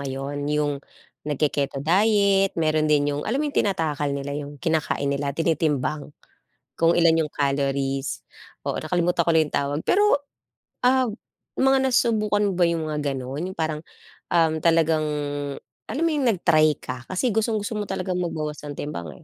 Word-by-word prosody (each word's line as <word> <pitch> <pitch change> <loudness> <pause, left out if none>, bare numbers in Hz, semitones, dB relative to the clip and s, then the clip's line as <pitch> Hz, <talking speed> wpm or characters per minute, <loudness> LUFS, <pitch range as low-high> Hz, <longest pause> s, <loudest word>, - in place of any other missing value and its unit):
ngayon, 140 +1 -4
yung 150 -2 0 0.5
nagke-keto 140 -1 -1
diet, 200 +1 +3
meron 155 -1 +1
din 145 -1 +3
yung 145 - -2
alam 235 - 0
mo - - -1
yung - - -1
tinatakal 150 -7 -1
nila 140 0 -4
yung 145 0 -6
kinakain 155 -2 0
nila, 140 0 -2
tinitimbang. 150 -3 0 0.7
Kung 165 +1 +3
ilan 165 -1 +4
yung - - -13
calories. 140 -1 -1 0.4
Oo, - - -1
nakalimutan 175 +2 +1
ko 170 - +1
lang 160 -1 +5
yung - - -13
tawag. 140 +1 0
Pero 410 -7 +3 0.6
ah, 260 0 +4 0.5
mga 270 0 +4
nasubukan 215 -4 +2
mo - - -2
ba 180 - +5
yung 165 -1 -1
mga 150 - -2 0.2
ganon? 135 +5 -4
Yung - - -12
parang, 155 -2 -2 0.5
um, 165 -2 +3
talagang 160 -1 +3 0.8
alam 295 - -2
mo 335 - +3
yung 280 -4 +1
nag-try 155 -7 +3
ka? 125 0 -6
Kasi 190 +7 0
gustong-gusto 215 0 -1
mo 205 - -3
talagang 185 -1 -2
magbawas 155 -3 -3
ng 145 -1 -6
timbang, 85 - -6
155 Hz, 160 wpm, -24 LUFS, 145-190 Hz, 0.8 s, lang